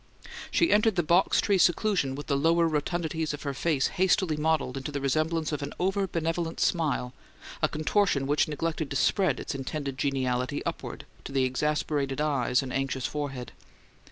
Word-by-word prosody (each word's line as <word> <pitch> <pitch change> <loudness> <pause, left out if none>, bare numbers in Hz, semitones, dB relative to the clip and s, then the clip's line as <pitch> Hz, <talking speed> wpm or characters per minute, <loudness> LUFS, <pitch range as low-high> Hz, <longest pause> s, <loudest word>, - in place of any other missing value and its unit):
She 335 - +2
entered 215 0 +4
the 175 - +2
box 170 +5 +3
tree 200 -3 +2
seclusion 175 -6 +2
with 145 - -6
the 140 - 0
lower 165 +4 +3
rotundities 160 0 -1
of - - -11
her 140 -2 -2
face 145 0 +1 0.2
hastily 185 -3 +3
modelled 150 -4 0
into 135 +2 -4
the 140 - -3
resemblance 155 +4 0
of 150 - -3
an 140 - -5
over 195 +2 +1
benevolent 165 0 -2
smile 150 -7 0 0.5
a - - +4
contortion 155 -2 +1
which 145 +2 +2
neglected 155 0 -2
to 135 - -4
spread 150 - +2
its - - -4
intended 135 0 -4
geniality 130 -1 -1
upward - - -5 0.2
to - - -6
the 135 -1 +2
exasperated 140 +1 -1
eyes 135 -4 +1
and 130 -1 -6
anxious 135 -1 -1
forehead. 135 -5 -4
150 Hz, 170 wpm, -28 LUFS, 135-165 Hz, 0.5 s, entered